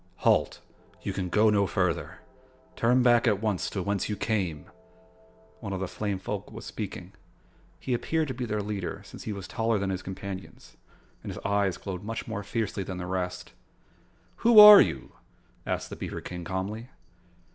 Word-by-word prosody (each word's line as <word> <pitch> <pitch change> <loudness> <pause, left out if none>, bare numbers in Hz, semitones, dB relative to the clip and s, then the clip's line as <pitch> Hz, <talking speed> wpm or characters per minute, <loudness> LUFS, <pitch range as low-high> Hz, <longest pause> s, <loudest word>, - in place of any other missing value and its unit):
"Halt! - - +3 0.4
You - - -3
can 90 -2 -3
go 110 +3 +4
no 100 -2 +2
further. - - -1 0.5
Turn 125 +2 +3
back 120 0 +4
at 105 -4 +3
once 105 -4 -1
to 95 - -3
whence 100 0 -1
you 105 - -1
came." 100 -8 -2 0.9
One 100 -4 -5
of 95 - -3
the 95 - -2
flame 100 +1 -3
folk 95 - -5
was - - -9
speaking. - - -6 0.7
He 130 - -2
appeared 160 +6 0
to - - -2
be 125 0 -4
their 105 -1 -2
leader, 100 -1 -4
since - - -11
he 110 - -3
was 100 -2 -6
taller 110 +4 0
than 95 -1 -1
his 95 0 -3
companions 95 0 -8 0.5
and - - -5
his - - -8
eyes 100 -2 +1
glowed 95 -3 -6
much 110 +1 -5
more 110 -3 -4
fiercely 105 0 -3
than 95 -1 -5
the 90 - -5
rest. 90 0 -4 0.8
"Who 235 -1 +4
are 210 -1 +12
you?" 65 - -2 0.6
asked - - -3
the - - -5
beaver - - -5
King 90 -1 -7
calmly. 100 +6 -4
100 Hz, 180 wpm, -27 LUFS, 95-110 Hz, 0.9 s, are